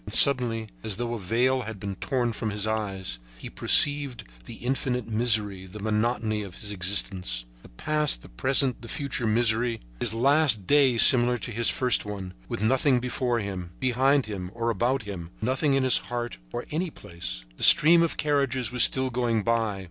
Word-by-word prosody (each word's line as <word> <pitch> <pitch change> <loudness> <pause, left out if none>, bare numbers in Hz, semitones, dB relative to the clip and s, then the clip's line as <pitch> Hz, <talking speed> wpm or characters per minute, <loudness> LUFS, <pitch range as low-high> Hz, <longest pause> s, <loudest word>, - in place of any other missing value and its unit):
And 105 - -3
suddenly, 120 -5 +4
as 110 -3 -2
though 120 0 -4
a 115 - -5
veil 125 +7 0
had 110 -3 -8
been 100 0 -5
torn 120 0 -2
from 110 0 -4
his 105 0 -2
eyes, 100 - -4 0.2
he - - -10
perceived 145 -4 +3 0.2
the - - -10
infinite 125 -1 -3
misery, 110 -4 0
the 105 +4 -11
monotony 110 +1 -2
of 95 -4 -9
his 105 - -8
existence: 90 -9 -1 0.2
the - - -16
past, 150 - -2
present 130 - +1
and 115 - -11
future 140 -5 -3
misery; 115 +1 +1 0.2
his 115 - 0
last 135 -4 +2
day 135 -2 +3
similar 125 0 +8
to 120 - -7
his 115 +1 0
first 125 -3 +1
one, 100 -3 -8 0.2
with - - -5
nothing 130 +2 +2
before 125 0 -2
him, 90 -4 -7
behind 130 +2 +1
him 95 -4 -7
or 115 0 -2
about 125 +2 -1
him, 95 -5 -8
nothing 135 +5 0
in 135 - +1
his 130 - +5
heart 120 - -6
or 120 - -6
any 170 +4 -2
place. - - -7
The - - -5
stream 165 +2 +7
of 170 - -1
carriages 140 -5 -1
was 125 -1 +4
still 130 -1 +3
going 120 -3 -1
by. 115 -3 -1
115 Hz, 180 wpm, -25 LUFS, 105-130 Hz, 0.2 s, similar